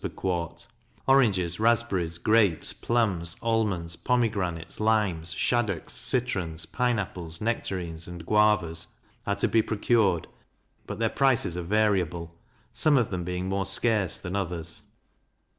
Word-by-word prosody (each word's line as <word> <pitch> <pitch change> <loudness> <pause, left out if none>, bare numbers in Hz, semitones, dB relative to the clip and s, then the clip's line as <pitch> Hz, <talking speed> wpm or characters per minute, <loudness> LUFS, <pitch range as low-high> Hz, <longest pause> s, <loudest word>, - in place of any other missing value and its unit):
per - - -2
quart; 85 -3 -3 0.4
oranges, 100 -11 +3
raspberries, 110 -7 +1
grapes, 105 -4 +2
plums, 95 -8 0
almonds, 105 -8 0
pomegranates, 100 -10 -1
limes, 105 -7 +1
shaddocks, 105 0 -1
citrons, 90 -10 0
pine 120 +6 0
apples, 85 -4 -5
nectarines, 90 -7 -3
and 85 -2 -8
guavas, 100 -6 +2 0.4
are - - +1
to - - +1
be 115 - +3
procured; 110 -5 +1 0.6
but - - -5
their 115 - +1
prices 120 -8 +2
are 90 - -2
variable, 90 -4 0 0.4
some 150 -2 +3
of 120 -5 +1
them 90 -2 -2
being 90 +1 -3
more 95 0 -1
scarce 110 -8 +1
than 90 0 -6
others. 85 -4 -3
95 Hz, 125 wpm, -27 LUFS, 85-110 Hz, 0.6 s, oranges